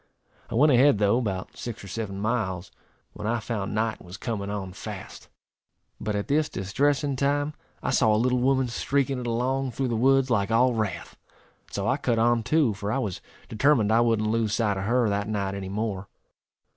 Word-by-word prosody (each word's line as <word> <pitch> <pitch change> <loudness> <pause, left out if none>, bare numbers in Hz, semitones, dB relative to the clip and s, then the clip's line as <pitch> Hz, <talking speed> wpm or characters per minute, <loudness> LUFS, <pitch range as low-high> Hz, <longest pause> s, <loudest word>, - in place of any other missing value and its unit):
I - - -4
went 145 +5 +5
ahead, 130 -1 +5
though, 105 +3 +3
about 95 -6 -4
six 120 -1 -6
or - - -9
seven 100 0 -4
miles, 100 -5 -2 0.4
when 105 - -5
I 115 +1 +1
found 105 -2 -3
night 110 0 -1
was 90 +2 -9
coming 105 -4 -4
on 100 -3 -4
fast; - - -9 0.7
but 105 -1 -2
at 100 - -2
this 150 +2 +2
distressing 140 +8 0
time 145 +2 0 0.3
I - - 0
saw 110 -4 +4
a 105 - +3
little 125 +2 +2
woman 130 0 +2
streaking 135 +2 0
it 120 - -4
along 130 +2 -1
through 130 0 -1
the 115 - 0
woods 135 +2 +3
like 100 -4 +2
all 120 +2 +4
wrath, 110 -5 -3 0.5
and - - -22
so 100 +1 -1
I 130 - +2
cut 125 -5 0
on 120 +1 +3
too, 145 -1 +2
for 100 +1 -4
I 135 - 0
was 105 -9 -3 0.3
determined 115 -2 +3
I 115 +1 +5
wouldn't 115 -2 +2
lose 110 -2 +1
sight 105 -3 +1
of 95 - -3
her 120 +1 +2
that 100 0 -1
night 100 -3 -2
any 95 -1 -5
more. 100 -1 -3
115 Hz, 200 wpm, -26 LUFS, 105-130 Hz, 0.7 s, went